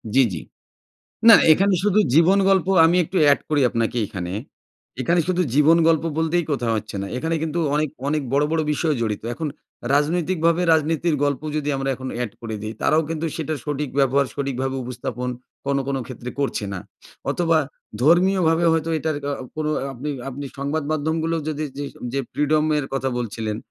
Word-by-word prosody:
জি, 135 - +7
জি। 80 - -4 0.9
না, 230 - +11 0.2
এখানে 195 +4 +3
শুধু 210 0 +3 0.2
জীবন 170 +5 +5
গল্প 190 -3 +3 0.2
আমি 170 +2 +4
একটু 185 +4 -6
এড - - +3
করি 150 -2 +2
আপনাকে 115 +1 -1
এইখানে। 90 -3 -5 0.7
এখানে 170 +7 +2
শুধু 180 0 +2
জীবন 150 +3 +5
গল্প 160 -1 +2
বলতেই 165 +2 +1
কোথাও 120 -4 0
হচ্ছে 105 -1 -7
না। - - -4
এখানে 160 +6 -1
কিন্তু 160 +1 -2 0.2
অনেক, 155 +1 +1 0.2
অনেক 150 -1 0
বড়ো, 145 +2 +3
বড়ো 160 -1 +1
বিষয় 155 +1 0
জড়িত। 110 -3 -2
এখন 155 +2 -3 0.5
রাজনৈতিকভাবে 170 +3 +1
রাজনীতির 160 +1 +1
গল্প 140 -1 -1
যদি 150 -1 -2
আমরা 135 0 -2
এখন 130 0 -7
অ্যাড 120 -3 -3
করে 115 -2 -5
দিই, 110 +1 -5
তারাও 155 +1 +3
কিন্তু 165 0 -2
সেটার 155 -2 -3
সঠিক 145 -1 -3
ব্যবহার, 140 +1 +3
সঠিকভাবে 135 -1 -2
উপস্থাপন 125 0 -4 0.4
কোনো, 140 0 +1
কোনো 135 -1 -1
ক্ষেত্রে 125 -1 -7
করছে 135 -6 -1
না। 95 - -4 0.5
অথবা 165 -2 +2 0.4
ধর্মীয়ভাবে 170 +1 +4
হয়তো 165 0 0
এটার 155 0 -2
আ - - -1 0.2
কোনো 155 0 -1 0.2
আপনি, 135 +4 -5 0.2
আপনি 135 +2 -6
সংবাদ 145 +3 -1
মাধ্যমগুলো 160 +2 -1
যদি 155 0 -2
যেই 145 -1 -3 0.2
যে 140 - 0
ফ্রিডমের 150 0 +1
কথা 135 0 0
বলছিলেন। 110 -2 -3
150 Hz, 170 wpm, -22 LUFS, 135-165 Hz, 0.9 s, না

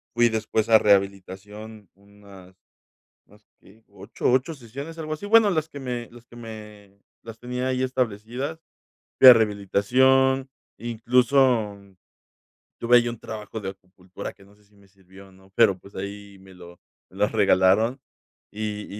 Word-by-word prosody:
fui 120 0 +4
después 110 0 -2
a 110 -1 +7
rehabilitación 100 +1 -2
unas 100 -2 -18 0.7
más 105 +1 -23
que 110 +3 -22
8- 100 +4 -3
8 130 +6 +1
sesiones, 140 +5 -10
algo 155 -1 -5
así. 155 +6 -7
Bueno, 220 0 +5
las 160 -3 -2
que 145 - -10
me 125 -3 -5
las 120 0 -16
que 120 - -18
me 105 -3 -12 0.2
las 115 -1 -10
tenía 125 +1 -4
ahí 130 0 -1
establecidas, 125 +4 -3 0.6
fui 130 - +9
a 125 - +12
rehabilitación. 130 +6 +2 0.3
Incluso 120 -1 +1 1.0
tuve 120 +1 +4
ahí 120 0 0
un 115 -2 -6
trabajo 110 0 -8
de 95 -2 -5
acupuntura 95 -1 -11
que 100 - -21
no 100 +1 -22
sé 105 0 -28
si 105 +1 -30
me 100 -1 -23
sirvió, 95 0 -18
o - - -21
no, 95 +1 -22
pero, 100 -4 +3
pues, 100 - -18
ahí 100 0 -8
me 95 0 -16
lo 85 -1 -14 0.3
me - - -18
las - - +1
regalaron. 110 +7 +3 0.5
Y 105 0 -5
110 Hz, 160 wpm, -24 LUFS, 100-125 Hz, 1.0 s, a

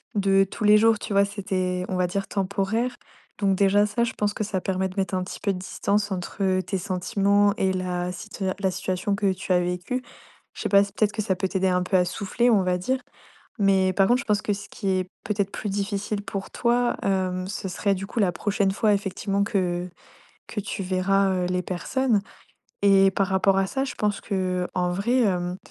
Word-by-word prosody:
de 195 -1 +4
tous 205 +3 -7
les 210 0 +7
jours, 225 0 +4
tu 210 - -5
vois, 200 0 +5
c'était, 185 -3 -2
on 190 - -1
va 180 0 +1
dire, 195 +2 -3
temporaire. 200 +5 -1 0.4
Donc 195 -2 +2
déjà, 200 +1 +4
ça, 215 +3 0
je 235 - -1
pense 205 -1 -1
que 215 - -2
ça 200 -2 -2
permet 190 0 -1
de 185 - -12
mettre 190 0 0
un 185 - 0
petit 180 - -7
peu 200 - 0
de - - -5
distance 200 +2 -1
entre, 190 +2 -4
heu, 185 -1 +2
tes 195 - -2
sentiments 200 +2 +2
et 190 - +2
la 180 -1 -2
situa 190 0 -4
la 190 -1 +1
situation 185 +2 -2
que 200 -1 +1
tu 185 0 -6
as 180 - +4
vécue. 180 +8 -2 0.5
Je - - -8
sais - - -1
pas 200 0 +6
si 200 - -7
peut-être 210 0 +1
que 220 - -2
ça 200 -3 0
peut 190 +1 -1
t'aider 190 0 0
un 180 0 +1
peu 185 +2 -1
à 180 - +3
souffler, 220 +6 0
on 205 -5 +4
va 180 0 +1
dire. 255 +9 -1 0.6
Mais 195 -2 +3
par 195 +1 +3
contre, 245 +3 +3
je - - -10
pense 210 -1 +1
que 210 - 0
ce 200 0 -8
qui 195 - -6
est 185 -1 0 0.2
peut-être 200 -2 -1
plus 210 - -4
difficile 200 +1 -2
pour 195 -1 -5
toi, 240 0 +1
hem, 185 -1 0
ce 195 0 -4
serait 195 +2 0
du 195 +1 -5
coup 235 - -4
la 190 -4 +3
prochaine 200 +1 0
fois 210 +2 +2
effectivement 200 0 -1
que 180 -4 -1 0.6
que 215 - -4
tu 195 0 -4
verras, 190 +1 +2
heu, 180 -1 0
les 180 0 0
personnes 225 +6 0 0.6
et 195 -1 +6
par 195 +1 0
rapport 195 0 +3
à 195 - +2
ça, 270 +7 -1
je 275 - -5
pense 210 -1 0
qu'en 180 -2 -1
vrai, 210 +8 +1
hem, 180 -4 0
195 Hz, 220 wpm, -25 LUFS, 185-205 Hz, 0.6 s, les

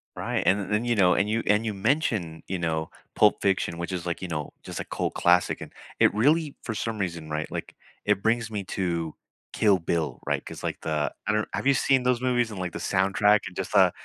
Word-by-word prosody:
Right, - - -1
and 100 +2 +4
th 100 - -5
then, 105 +3 +1
you 120 -1 +2
know, 90 -3 +5
and 100 - +2
you 115 +1 0
and 105 +2 +3
you 110 - -1
mentioned, 100 - 0
you 95 - -2
know, 80 -2 -1 0.3
Pulp 105 - +4
Fiction, 95 -3 0
which 85 +2 -4
is, 90 -2 -3
like, 85 -1 -3
you 90 - -5
know, 75 -3 -3
just - - -6
a - - -4
cult - - -2
classic, 90 0 +3
and - - -9 0.3
it - - +5
really 145 +7 +2
for 115 - -3
some 115 +1 -3
reason, 85 -5 -3
right, 75 0 -3
like, - - -5 0.3
it 105 -1 +1
brings 115 0 +1
me 105 -2 -3
to 85 -4 -1 0.4
Kill 105 -3 +3
Bill, 80 -2 -2
right - - -1
'cause, - - -9
like, - - -3
the 75 -2 -1
I 105 - +2
don't 105 0 0
have 135 - -1
you 140 - +6
seen 130 -1 +3
those 125 -1 +2
movies 120 -2 +1
and, 105 -4 -7
like, 90 -1 -3
the - - -6
soundtrack 100 +2 +3
and 90 - -10
just, - - -3
uh, - - +6
100 Hz, 240 wpm, -26 LUFS, 85-115 Hz, 0.4 s, you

